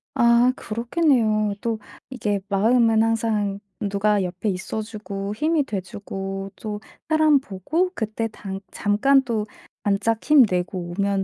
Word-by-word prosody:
아 235 +1 +5
그렇겠네요. 230 -4 +1
또 230 -2 -1 0.3
이게 210 -6 -1
마음은 225 +2 +4
항상 215 -3 0 0.2
누가 205 0 +1
옆에 180 +3 -3
있어 190 +4 -3
주고 205 -2 -5
힘이 305 +6 +1
돼 215 -7 -3
주고 195 +1 -6
또 210 -1 -6 0.3
사람 310 -2 +4
보고 280 - -1
그때 220 0 -2
당 195 -2 -6
잠깐 265 +7 +3
또 225 -5 -2 0.4
반짝 210 +3 +1
힘내고 180 -10 +3
오면 200 -1 +1
215 Hz, 240 characters per minute, -23 LUFS, 200-235 Hz, 0.4 s, 아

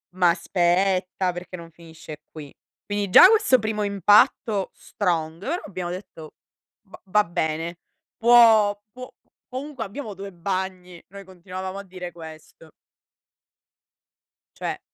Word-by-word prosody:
Ma 180 -2 +4
aspetta 185 +1 0
perché 180 +1 -8
non 165 -1 -12
finisce 160 -2 -12
qui. 150 -3 -11 0.3
Quindi 205 -1 -3
già 365 - +9
questo 425 - +4
primo 215 -1 -3
impatto 205 +1 +3
strong, 165 -2 -3 0.2
abbiamo 185 -3 -6
detto: 180 -4 -9 0.5
"Va - - -15
va 210 +2 +3
bene, 165 0 -3 0.4
può 225 -3 +5
può 255 +2 -10 0.4
comunque 265 -1 -6
abbiamo 215 +1 -7
2 195 +1 -9
bagni", 185 -1 -5
noi 200 0 -11
continuavamo 185 +1 -8
a - - -8
dire 180 -2 -9
questo. 160 -1 -13 1.9
Cioè, - - -4
185 Hz, 115 wpm, -23 LUFS, 170-205 Hz, 1.9 s, già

